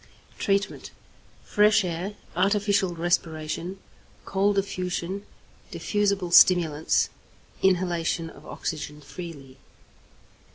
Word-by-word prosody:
Treatment. 200 Hz, -2 st, 0 dB, 0.5 s
Fresh 210 Hz, 0 st, +4 dB
air, 180 Hz, +3 st, -3 dB, 0.2 s
artificial 200 Hz, -1 st, +2 dB
respiration, 165 Hz, +1 st, -1 dB, 0.5 s
cold 200 Hz, +1 st, +1 dB
affusion, 190 Hz, 0 st, -2 dB, 0.4 s
diffusible 200 Hz, -4 st, 0 dB
stimulants; 165 Hz, -4 st, +5 dB, 0.5 s
inhalation 175 Hz, -3 st, +1 dB
of -, -, -13 dB
oxygen 150 Hz, -2 st, -5 dB
freely. 145 Hz, -4 st, -9 dB
180 Hz, 75 wpm, -26 LUFS, 165-200 Hz, 0.5 s, stimulants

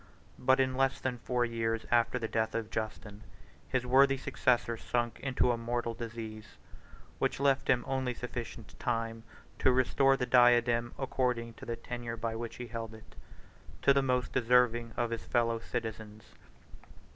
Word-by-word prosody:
But 130 Hz, +1 st, +4 dB
in 130 Hz, -1 st, +2 dB
less 135 Hz, +1 st, +1 dB
than 125 Hz, -2 st, -3 dB
four 125 Hz, 0 st, 0 dB
years 115 Hz, -1 st, -2 dB
after 120 Hz, +1 st, +3 dB
the 115 Hz, -2 st, -2 dB
death 110 Hz, 0 st, -1 dB
of 115 Hz, -1 st, -3 dB
Justin, 110 Hz, -1 st, -5 dB, 0.5 s
his 125 Hz, -1 st, 0 dB
worthy 135 Hz, +2 st, +5 dB
successor 120 Hz, -2 st, +1 dB
sunk 120 Hz, +1 st, -2 dB
into 130 Hz, -2 st, +1 dB
a 120 Hz, -, 0 dB
mortal 120 Hz, 0 st, -2 dB
disease, 110 Hz, -3 st, -8 dB, 0.6 s
which -, -, 0 dB
left 140 Hz, -1 st, +2 dB
him 120 Hz, -1 st, +3 dB
only 130 Hz, -2 st, -1 dB
sufficient 120 Hz, -2 st, -7 dB
time 115 Hz, -1 st, -2 dB, 0.4 s
to 130 Hz, -, +4 dB
restore 135 Hz, +1 st, +3 dB
the 125 Hz, -, -1 dB
diadem, 120 Hz, -1 st, +4 dB
according 125 Hz, -3 st, -1 dB
to -, -, -12 dB
the 115 Hz, -, -2 dB
tenure 120 Hz, -1 st, -6 dB
by 115 Hz, 0 st, -3 dB
which 115 Hz, 0 st, -5 dB
he 125 Hz, -, -6 dB
held 115 Hz, -1 st, -6 dB
it, 110 Hz, -, -16 dB, 0.7 s
to 140 Hz, -, +6 dB
the 140 Hz, -, +3 dB
most 125 Hz, -1 st, 0 dB
deserving 120 Hz, -1 st, +3 dB
of 120 Hz, -1 st, 0 dB
his 115 Hz, -, -4 dB
fellow 115 Hz, -1 st, +1 dB
citizens. 110 Hz, -2 st, -5 dB
120 Hz, 160 wpm, -31 LUFS, 115-125 Hz, 0.7 s, to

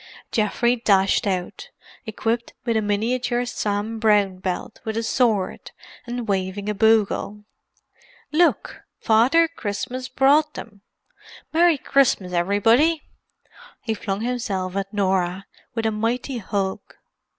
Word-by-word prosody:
Geoffrey 235 Hz, +2 st, +1 dB
dashed 200 Hz, -3 st, +2 dB
out, 185 Hz, -, -3 dB, 0.4 s
equipped 230 Hz, +2 st, -2 dB
with 230 Hz, -2 st, 0 dB
a 220 Hz, -, +2 dB
miniature 240 Hz, +4 st, 0 dB
Sam 215 Hz, -1 st, -3 dB
Brown 205 Hz, -4 st, +2 dB
belt 185 Hz, +2 st, -4 dB
with 220 Hz, 0 st, -3 dB
a 230 Hz, -, -1 dB
sword, 225 Hz, -5 st, 0 dB, 0.4 s
and 240 Hz, -1 st, -4 dB
waving 195 Hz, 0 st, -2 dB
a 210 Hz, -, 0 dB
bugle. 210 Hz, -1 st, +1 dB, 0.9 s
"Look! 340 Hz, +3 st, +1 dB, 0.2 s
Father 250 Hz, +10 st, +4 dB
Christmas 255 Hz, -2 st, -5 dB
brought 295 Hz, +3 st, +3 dB
them! 205 Hz, -3 st, -10 dB, 0.7 s
Merry 335 Hz, -1 st, +4 dB
Christmas, 255 Hz, -10 st, +1 dB
everybody." 225 Hz, -, +3 dB, 0.8 s
He 225 Hz, -, -1 dB
flung 200 Hz, -1 st, -4 dB
himself 210 Hz, -7 st, -2 dB
at 195 Hz, 0 st, -3 dB
Norah, 190 Hz, -2 st, 0 dB, 0.3 s
with 225 Hz, -1 st, -2 dB
a 220 Hz, -, +2 dB
mighty 235 Hz, +4 st, -2 dB
hug. 195 Hz, -2 st, -2 dB
220 Hz, 115 wpm, -22 LUFS, 200-245 Hz, 0.9 s, Father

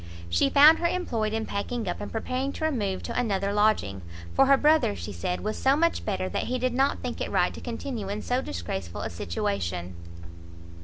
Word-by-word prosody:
She 85 Hz, +11 st, +3 dB
found 305 Hz, +3 st, +7 dB
her 340 Hz, -, +2 dB
employed 235 Hz, -12 st, -1 dB
in 220 Hz, 0 st, -2 dB
packing 215 Hz, +2 st, -3 dB
up, 175 Hz, -, -3 dB
and -, -, -6 dB
preparing 255 Hz, +4 st, -2 dB
to 315 Hz, -, -3 dB
remove 210 Hz, -11 st, -1 dB
to -, -, -5 dB
another 200 Hz, -4 st, 0 dB
lodging, 205 Hz, -, +2 dB, 0.3 s
for 270 Hz, -, +4 dB
her 275 Hz, 0 st, +6 dB
brother, 300 Hz, -, +3 dB
she 90 Hz, +3 st, -6 dB
said, 180 Hz, -, -3 dB
was 215 Hz, +1 st, -3 dB
so 270 Hz, +1 st, +4 dB
much 335 Hz, +3 st, +1 dB
better, 190 Hz, -3 st, -1 dB
that -, -, -2 dB
he 255 Hz, -, -1 dB
did 255 Hz, 0 st, 0 dB
not 270 Hz, +2 st, +1 dB
think -, -, -4 dB
it -, -, -2 dB
right -, -, +2 dB
to -, -, -9 dB
continue 230 Hz, -3 st, -5 dB
in 205 Hz, +1 st, -4 dB
so 250 Hz, +1 st, 0 dB
disgraceful 85 Hz, -, -5 dB
a -, -, -4 dB
situation. 85 Hz, +1 st, -3 dB
215 Hz, 205 wpm, -27 LUFS, -, 0.3 s, found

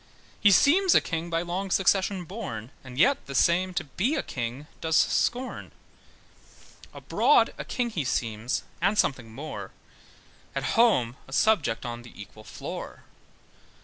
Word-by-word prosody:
He 205 Hz, -, +6 dB
seems 340 Hz, -, +5 dB
a -, -, +8 dB
king 165 Hz, +1 st, -4 dB
by 165 Hz, 0 st, 0 dB
long 185 Hz, +3 st, -3 dB
succession 190 Hz, 0 st, +2 dB
born, 140 Hz, -, -6 dB
And 130 Hz, -1 st, -11 dB
yet 275 Hz, -, +3 dB
the 135 Hz, -, -6 dB
same 180 Hz, +7 st, +3 dB
to -, -, 0 dB
be 190 Hz, -, -1 dB
a 290 Hz, -, -1 dB
king 125 Hz, +3 st, -5 dB, 0.2 s
does 160 Hz, -1 st, +2 dB
scorn. 250 Hz, +2 st, 0 dB, 1.2 s
Abroad -, -, +2 dB
a -, -, -3 dB
king 240 Hz, -2 st, -2 dB
he 170 Hz, -9 st, -2 dB
seems, 115 Hz, -2 st, -2 dB, 0.2 s
and 195 Hz, +4 st, +2 dB
something 120 Hz, -, 0 dB
more, 145 Hz, +7 st, -7 dB, 0.9 s
At -, -, -2 dB
home 135 Hz, -, +3 dB
a 135 Hz, -, -11 dB
subject 145 Hz, -, +2 dB
on 120 Hz, 0 st, -5 dB
the 120 Hz, -3 st, -15 dB
equal 110 Hz, +1 st, -11 dB
floor. 110 Hz, -, -8 dB
165 Hz, 145 wpm, -27 LUFS, 125-205 Hz, 1.2 s, a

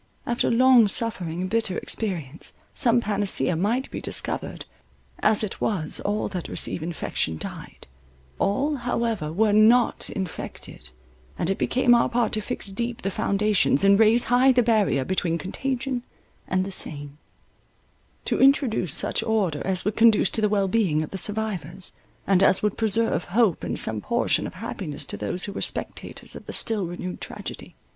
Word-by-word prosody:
After 240 Hz, 0 st, 0 dB
long 250 Hz, -1 st, +6 dB
suffering 190 Hz, -6 st, 0 dB
and 185 Hz, -, -2 dB
bitter 225 Hz, -5 st, 0 dB
experience, 165 Hz, -, -4 dB, 0.2 s
some 240 Hz, 0 st, +3 dB
panacea 205 Hz, -4 st, +1 dB
might 225 Hz, +10 st, -1 dB
be -, -, -5 dB
discovered; -, -, -2 dB, 0.5 s
as 220 Hz, -, +3 dB
it 210 Hz, -, -5 dB
was, 175 Hz, -8 st, 0 dB
all 205 Hz, +1 st, -1 dB
that 185 Hz, -4 st, -5 dB
received -, -, 0 dB
infection 160 Hz, -, -3 dB
died— -, -, -8 dB, 0.5 s
all 280 Hz, +9 st, 0 dB
however 230 Hz, -9 st, -2 dB
were 210 Hz, +5 st, +2 dB
not 225 Hz, +3 st, +4 dB
infected; 175 Hz, -, -7 dB, 0.5 s
and 175 Hz, -, -1 dB
it 195 Hz, -, -3 dB
became 250 Hz, -1 st, +3 dB
our 235 Hz, -, +3 dB
part 240 Hz, -1 st, 0 dB
to 215 Hz, -, -1 dB
fix 200 Hz, -1 st, -6 dB
deep 235 Hz, +4 st, -3 dB
the 195 Hz, -, -1 dB
foundations, 200 Hz, -6 st, +1 dB
and 200 Hz, +1 st, +5 dB
raise 225 Hz, +2 st, +5 dB
high 250 Hz, +2 st, +4 dB
the 250 Hz, -1 st, +3 dB
barrier 210 Hz, -, +2 dB
between 175 Hz, -1 st, 0 dB
contagion 255 Hz, -, -3 dB, 0.5 s
and 185 Hz, 0 st, 0 dB
the 195 Hz, -, -6 dB
sane; 145 Hz, -4 st, -3 dB, 1.1 s
to -, -, 0 dB
introduce 265 Hz, -, +3 dB
such -, -, -1 dB
order 195 Hz, -10 st, 0 dB
as 185 Hz, -2 st, 0 dB
would 210 Hz, +1 st, -1 dB
conduce 225 Hz, -4 st, +4 dB
to 220 Hz, -, +2 dB
the 210 Hz, -, +2 dB
well 200 Hz, -2 st, +1 dB
being 185 Hz, -7 st, +1 dB
of 155 Hz, -, -8 dB
the 190 Hz, -, -3 dB
survivors, 190 Hz, -4 st, -3 dB, 0.3 s
and 190 Hz, -1 st, +3 dB
as 195 Hz, 0 st, +4 dB
would 210 Hz, -2 st, +1 dB
preserve 225 Hz, +1 st, 0 dB
hope 210 Hz, -2 st, +1 dB
and -, -, -3 dB
some 110 Hz, -1 st, -2 dB
portion -, -, 0 dB
of -, -, -10 dB
happiness 145 Hz, -1 st, -4 dB
to -, -, -2 dB
those 105 Hz, -, -3 dB
who 200 Hz, -, -5 dB
were -, -, -5 dB
spectators -, -, -5 dB
of -, -, -11 dB
the -, -, -5 dB
still 210 Hz, -5 st, 0 dB
renewed 180 Hz, +1 st, -6 dB
tragedy. -, -, -7 dB
205 Hz, 165 wpm, -24 LUFS, 180-230 Hz, 1.1 s, long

